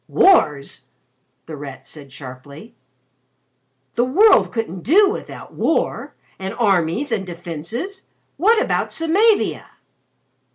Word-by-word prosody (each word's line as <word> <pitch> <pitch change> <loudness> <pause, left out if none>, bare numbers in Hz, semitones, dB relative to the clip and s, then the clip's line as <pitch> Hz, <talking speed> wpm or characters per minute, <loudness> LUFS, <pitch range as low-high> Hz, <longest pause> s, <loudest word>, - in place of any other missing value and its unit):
"Wars!" 150 - +2 0.6
The 160 - -8
Rat 135 -2 -9
said 140 -1 -11
sharply. 140 - -11 1.2
"The 240 - +1
World 375 - +4
couldn't 205 -6 -4
do 390 - +5
without - - -8
war - - -1 0.2
and 190 +3 -5
armies 200 - +1
and 215 -4 -1
defences! 175 - -7 0.3
What 435 +8 +3
about - - 0
Samavia?" 400 +7 +1
215 Hz, 100 wpm, -20 LUFS, -, 1.2 s, do